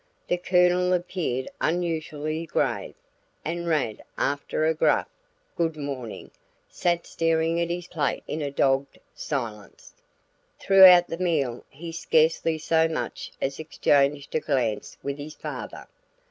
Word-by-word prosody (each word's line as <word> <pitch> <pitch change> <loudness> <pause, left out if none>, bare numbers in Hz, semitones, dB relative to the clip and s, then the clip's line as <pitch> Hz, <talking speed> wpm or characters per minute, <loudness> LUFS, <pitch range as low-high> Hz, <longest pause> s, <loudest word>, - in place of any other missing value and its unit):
The 175 - +1
Colonel 180 0 +3
appeared 175 -8 -2
unusually 160 -2 -2
grave, - - -1 0.5
and 170 +2 -3
Rad, 145 -10 -1
after 145 +2 -1
a 160 - +3
gruff 160 - +2 0.5
"good 165 -2 -1
morning," 135 -6 -6 0.4
sat 175 -1 -1
staring 165 0 +1
at 170 - -1
his 175 0 -3
plate 160 -5 -2
in 155 - -3
a 145 - -2
dogged 135 0 +1 0.2
silence. 110 -8 -6 0.7
Throughout 185 -2 +8
the 165 - -5
meal 145 -9 0
he 165 +4 -8
scarcely 160 0 +2
so 160 +1 +2
much 160 - -4
as 135 +2 -2
exchanged 145 -2 +1
a - - +2
glance 125 -8 -1
with 140 +1 -4
his 150 +2 -8
father. - - -7
160 Hz, 130 wpm, -25 LUFS, 140-170 Hz, 0.7 s, Throughout